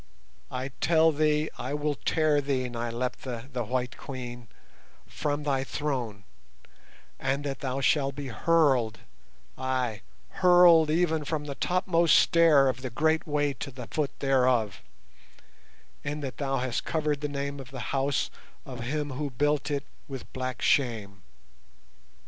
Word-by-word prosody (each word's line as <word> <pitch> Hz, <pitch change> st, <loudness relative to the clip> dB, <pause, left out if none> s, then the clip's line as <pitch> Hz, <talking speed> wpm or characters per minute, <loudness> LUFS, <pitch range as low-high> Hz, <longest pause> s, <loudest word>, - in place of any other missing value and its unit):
"I 130 Hz, +1 st, -4 dB
tell 160 Hz, -1 st, +5 dB
thee 150 Hz, 0 st, +1 dB
I 135 Hz, +3 st, -3 dB
will 150 Hz, 0 st, 0 dB
tear 150 Hz, +4 st, +1 dB
thee, 135 Hz, -2 st, -1 dB
Nyleptha, 120 Hz, +1 st, -4 dB
the 125 Hz, -1 st, -1 dB
White 125 Hz, +2 st, -2 dB
Queen, 120 Hz, -3 st, -7 dB, 0.6 s
from 150 Hz, 0 st, -3 dB
thy 135 Hz, -2 st, 0 dB
throne, 125 Hz, -8 st, -3 dB, 1.0 s
and 135 Hz, +2 st, -1 dB
that 140 Hz, -2 st, -4 dB
thou 135 Hz, 0 st, -2 dB
shalt 135 Hz, -1 st, +2 dB
be 140 Hz, -2 st, -5 dB
hurled—ay, 125 Hz, -, -1 dB, 0.3 s
hurled 175 Hz, -4 st, +6 dB
even 160 Hz, -1 st, +2 dB
from 150 Hz, 0 st, -2 dB
the 140 Hz, -, -4 dB
topmost 175 Hz, 0 st, +2 dB
stair 165 Hz, -5 st, +5 dB
of 130 Hz, -1 st, -1 dB
the 130 Hz, -, -4 dB
great 160 Hz, +7 st, +1 dB
way 145 Hz, -1 st, +1 dB
to 135 Hz, -, -6 dB
the 125 Hz, -2 st, -8 dB
foot 150 Hz, -3 st, -2 dB
thereof, 125 Hz, -7 st, +2 dB, 1.2 s
in 150 Hz, +1 st, -3 dB
that 135 Hz, -2 st, -5 dB
thou 135 Hz, -1 st, -1 dB
hast 125 Hz, -1 st, -1 dB
covered 150 Hz, -3 st, -1 dB
the 150 Hz, -, -2 dB
name 140 Hz, 0 st, -4 dB
of 130 Hz, -2 st, -9 dB
the 130 Hz, -3 st, -6 dB
House 135 Hz, 0 st, 0 dB, 0.3 s
of 130 Hz, -2 st, -8 dB
him 145 Hz, +4 st, -2 dB
who 145 Hz, +2 st, -3 dB
built 145 Hz, +3 st, 0 dB
it 140 Hz, -1 st, -1 dB, 0.2 s
with 135 Hz, -3 st, -8 dB
black 130 Hz, -2 st, -4 dB
shame. 110 Hz, -7 st, +1 dB
140 Hz, 140 wpm, -28 LUFS, 125-150 Hz, 1.2 s, hurled